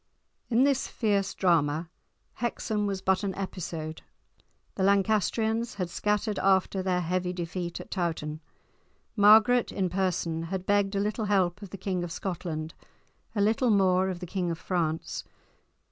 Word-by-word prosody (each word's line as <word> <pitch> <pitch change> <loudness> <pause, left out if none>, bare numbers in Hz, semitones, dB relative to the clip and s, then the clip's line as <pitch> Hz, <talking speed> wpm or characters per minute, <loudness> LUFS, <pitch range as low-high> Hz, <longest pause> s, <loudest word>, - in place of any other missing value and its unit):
In 240 +1 +4
this 275 -1 +2
fierce 200 -4 0
drama, 165 -3 +2 0.5
Hexham 215 -3 -2
was 195 -1 -3
but 190 +1 +2
an 195 -2 -2
episode. 165 -5 -5 0.7
The - - -4
Lancastrians 220 +4 +2
had 180 -4 -3
scattered 210 +1 0
after 190 0 +2
their 185 -1 0
heavy 180 +1 -1
defeat 175 0 -4
at - - -10
Towton. 160 -4 -2 0.7
Margaret 220 +3 +6
in 185 -3 -1
person 175 -3 -1
had 185 +2 -4
begged 205 0 +2
a - - +1
little 210 +2 -1
help 195 -2 +1
of 200 - -8
the 195 - -7
King 185 -2 -2
of 175 - -5
Scotland, 165 -4 -4 0.6
a 205 - +1
little 225 +4 +2
more 190 -2 +3
of 180 -1 -5
the - - -4
King 180 0 -2
of 165 - -2
France. 165 -3 -2
190 Hz, 150 wpm, -28 LUFS, 175-205 Hz, 0.7 s, Margaret